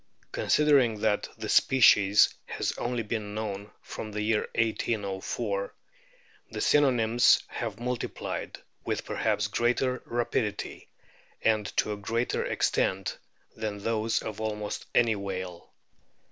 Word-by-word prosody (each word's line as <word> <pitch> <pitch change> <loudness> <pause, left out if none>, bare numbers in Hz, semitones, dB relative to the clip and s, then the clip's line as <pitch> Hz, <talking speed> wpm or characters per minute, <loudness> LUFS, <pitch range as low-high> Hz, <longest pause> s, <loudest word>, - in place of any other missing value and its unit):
Considering 135 -8 +3
that 110 -2 +1
the - - -5
species 105 -6 +5
has - - -2
been - - -7
only 115 -2 -1
known 105 -1 -5
from 110 - -7
the 105 0 -2
year 110 0 +1
1804, 115 - -1 0.7
the - - -6
synonyms 120 -4 +4
have 115 -4 -5
multiplied 125 0 -4 0.3
with - - -2
perhaps - - 0
greater 125 +2 0
rapidity 115 -3 -2 0.5
and 110 -2 +2
to 105 - +2
a - - -6
greater 115 +4 -1
extent 95 0 0 0.4
than 110 -2 -3
those 110 +2 0
of 110 -1 -5
almost 105 -1 -4
any 115 -2 +4
whale. 95 -3 -6
110 Hz, 115 wpm, -28 LUFS, 105-120 Hz, 0.7 s, species